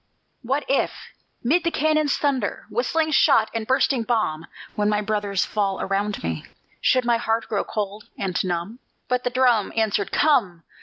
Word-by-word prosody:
"What 270 Hz, +4 st, -1 dB
if, 275 Hz, -, +2 dB, 0.5 s
'mid 315 Hz, +9 st, +2 dB
the 335 Hz, -, +2 dB
cannons' 310 Hz, -2 st, +1 dB
thunder, 265 Hz, -7 st, -1 dB
Whistling 315 Hz, +6 st, 0 dB
shot 250 Hz, -8 st, +4 dB
and 225 Hz, -1 st, -3 dB
bursting 260 Hz, -1 st, +2 dB
bomb, 215 Hz, -9 st, -1 dB, 0.3 s
When 210 Hz, 0 st, +1 dB
my 210 Hz, 0 st, +2 dB
brothers 205 Hz, -2 st, -1 dB
fall 200 Hz, -2 st, -1 dB
around 200 Hz, +1 st, -2 dB
me, 80 Hz, -2 st, -3 dB, 0.4 s
Should 255 Hz, -1 st, +3 dB
my 240 Hz, -1 st, +3 dB
heart 225 Hz, 0 st, -1 dB
grow 205 Hz, -3 st, -1 dB
cold 210 Hz, 0 st, -4 dB
and 190 Hz, -3 st, -1 dB
numb?" 180 Hz, +6 st, -3 dB, 0.3 s
But 250 Hz, 0 st, 0 dB
the -, -, +2 dB
drum 245 Hz, -4 st, +2 dB
Answered: 205 Hz, -3 st, 0 dB
"Come! 215 Hz, -, +2 dB
225 Hz, 160 wpm, -23 LUFS, 200-260 Hz, 0.5 s, shot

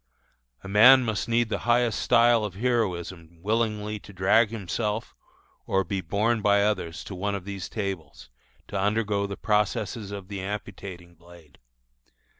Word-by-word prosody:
A -, -, -8 dB
man 125 Hz, +6 st, +7 dB
must 110 Hz, -1 st, -2 dB
need 115 Hz, -1 st, +2 dB
the -, -, -2 dB
highest 120 Hz, -2 st, +3 dB
style 115 Hz, -1 st, +4 dB
of 100 Hz, -4 st, -4 dB
heroism 95 Hz, -7 st, -2 dB
willingly 105 Hz, -1 st, -1 dB
to 100 Hz, -, -14 dB
drag 100 Hz, +4 st, +3 dB
himself 105 Hz, +1 st, -3 dB, 0.5 s
or 95 Hz, 0 st, +2 dB
be 95 Hz, +2 st, -3 dB
borne 105 Hz, +6 st, 0 dB
by 100 Hz, 0 st, +4 dB
others 95 Hz, -5 st, -2 dB
to -, -, -8 dB
one 100 Hz, +2 st, -2 dB
of 95 Hz, -2 st, -6 dB
these 100 Hz, -3 st, -6 dB
tables, 95 Hz, -, -6 dB, 0.4 s
to 100 Hz, -, -2 dB
undergo 105 Hz, 0 st, 0 dB
the 100 Hz, -, -6 dB
processes 105 Hz, 0 st, -1 dB
of 100 Hz, -2 st, -7 dB
the 100 Hz, -2 st, -5 dB
amputating 95 Hz, -3 st, -7 dB
blade. 85 Hz, -3 st, -18 dB
100 Hz, 150 wpm, -26 LUFS, 95-110 Hz, 0.5 s, man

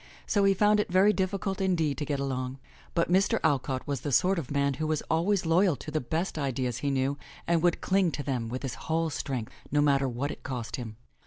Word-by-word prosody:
So 200 Hz, -2 st, +2 dB
he 195 Hz, 0 st, +4 dB
found 210 Hz, +2 st, +4 dB
it 210 Hz, -, 0 dB
very 195 Hz, +3 st, +5 dB
difficult 195 Hz, 0 st, -1 dB
indeed 165 Hz, -6 st, +1 dB
to 150 Hz, -, -2 dB
get 145 Hz, -2 st, -2 dB
along. 130 Hz, -1 st, -3 dB, 0.4 s
But 170 Hz, 0 st, +1 dB
Mr. 190 Hz, +2 st, +3 dB
Alcott 135 Hz, -4 st, 0 dB
was 140 Hz, -4 st, -3 dB
the 145 Hz, -, -3 dB
sort 180 Hz, +7 st, +3 dB
of 140 Hz, -, -6 dB
man 140 Hz, -1 st, +1 dB
who 155 Hz, -, 0 dB
was 155 Hz, -1 st, 0 dB
always 175 Hz, +4 st, +2 dB
loyal 170 Hz, +1 st, +4 dB
to 155 Hz, -, -8 dB
the 155 Hz, -, 0 dB
best 160 Hz, +6 st, -2 dB
ideas 130 Hz, -3 st, -1 dB
he 140 Hz, -, -1 dB
knew 135 Hz, +1 st, 0 dB, 0.3 s
and 170 Hz, -1 st, +2 dB
would 175 Hz, 0 st, +2 dB
cling 190 Hz, -2 st, +2 dB
to 145 Hz, -, -3 dB
them 125 Hz, -5 st, -2 dB
with 130 Hz, +3 st, -5 dB
his 135 Hz, -, -3 dB, 0.2 s
whole 160 Hz, 0 st, +1 dB
strength, 130 Hz, -6 st, -4 dB, 0.2 s
no 145 Hz, -, +2 dB
matter 140 Hz, -2 st, +3 dB
what 130 Hz, +5 st, -2 dB
it -, -, -9 dB
cost 125 Hz, -1 st, -4 dB
him. 110 Hz, -4 st, -7 dB
145 Hz, 230 wpm, -28 LUFS, 135-180 Hz, 0.4 s, very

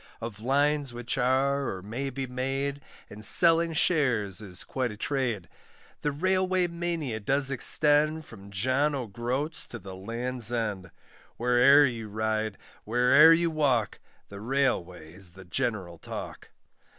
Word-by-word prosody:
Of 110 Hz, -2 st, -7 dB
lines 140 Hz, +2 st, 0 dB
which 120 Hz, 0 st, -4 dB
are, 135 Hz, +2 st, +1 dB
or 95 Hz, -1 st, -7 dB
may 120 Hz, +7 st, -4 dB
be 135 Hz, 0 st, -5 dB
made, 135 Hz, +3 st, -3 dB, 0.3 s
And 105 Hz, +1 st, -11 dB
selling 165 Hz, -, +5 dB
shares 120 Hz, -, +1 dB
is 95 Hz, -4 st, 0 dB
quite 130 Hz, -2 st, -3 dB
a 105 Hz, -, -10 dB
trade. 120 Hz, -, -2 dB, 0.5 s
The 145 Hz, -, -1 dB
Railway 185 Hz, +3 st, +1 dB
mania 170 Hz, -8 st, -3 dB
does 135 Hz, +5 st, +1 dB
extend, 150 Hz, +4 st, +3 dB
From 100 Hz, +1 st, -13 dB
John 130 Hz, +9 st, 0 dB
O'Groats 125 Hz, +6 st, -3 dB
to 120 Hz, -, -8 dB
the 95 Hz, -4 st, -10 dB
Land's 120 Hz, +4 st, -2 dB
End; 105 Hz, -6 st, -3 dB, 0.5 s
Where'er 125 Hz, +4 st, +5 dB
you 115 Hz, -4 st, -4 dB
ride, 110 Hz, -1 st, -2 dB, 0.3 s
where'er 125 Hz, +8 st, +5 dB
you 165 Hz, 0 st, +3 dB
walk, 135 Hz, -8 st, 0 dB, 0.3 s
The 100 Hz, -, -9 dB
Railway 90 Hz, -, -2 dB
is 90 Hz, -2 st, -12 dB
the 95 Hz, 0 st, -13 dB
general 95 Hz, -5 st, -3 dB
talk. -, -, -8 dB
125 Hz, 140 wpm, -27 LUFS, 110-145 Hz, 0.5 s, selling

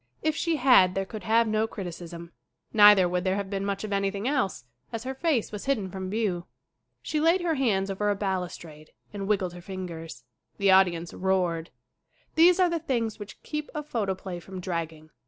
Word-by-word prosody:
If 310 Hz, -1 st, +1 dB
she 335 Hz, 0 st, 0 dB
had 245 Hz, -10 st, +5 dB
there 195 Hz, 0 st, -1 dB
could 210 Hz, 0 st, -8 dB
have 230 Hz, +1 st, +3 dB
no 215 Hz, +1 st, +1 dB
criticism. 170 Hz, -4 st, -8 dB, 0.4 s
Neither 205 Hz, -4 st, +8 dB
would 180 Hz, 0 st, -1 dB
there 190 Hz, 0 st, +1 dB
have 200 Hz, -1 st, -4 dB
been 195 Hz, -1 st, -2 dB
much 200 Hz, 0 st, -2 dB
of 210 Hz, -1 st, -3 dB
anything 200 Hz, +2 st, -1 dB
else, 255 Hz, -, -1 dB, 0.3 s
as 230 Hz, -1 st, -4 dB
her 260 Hz, +1 st, -4 dB
face 270 Hz, -4 st, 0 dB
was 210 Hz, -1 st, -6 dB
hidden 215 Hz, -9 st, -1 dB
from 190 Hz, 0 st, -5 dB
view. 195 Hz, -5 st, -1 dB, 0.6 s
She 305 Hz, -, -1 dB
laid 335 Hz, +4 st, +3 dB
her 340 Hz, -2 st, +1 dB
hands 205 Hz, -9 st, +1 dB
over 205 Hz, +2 st, -1 dB
a 205 Hz, -, +2 dB
balustrade 180 Hz, -6 st, -5 dB, 0.2 s
and 200 Hz, -1 st, -4 dB
wiggled 195 Hz, -4 st, 0 dB
her 175 Hz, -, -10 dB
fingers. 170 Hz, -8 st, -7 dB, 0.3 s
The 200 Hz, -1 st, +3 dB
audience 175 Hz, -3 st, +3 dB
roared. 180 Hz, -3 st, 0 dB, 0.6 s
These 350 Hz, +3 st, +6 dB
are 365 Hz, -, +5 dB
the 335 Hz, -, 0 dB
things 235 Hz, -8 st, -2 dB
which 205 Hz, -1 st, -10 dB
keep 300 Hz, -1 st, -4 dB
a 300 Hz, -, -3 dB
photoplay 195 Hz, -9 st, -3 dB
from 190 Hz, +2 st, -9 dB
dragging. 165 Hz, -3 st, -5 dB
195 Hz, 190 wpm, -27 LUFS, 180-230 Hz, 0.6 s, Neither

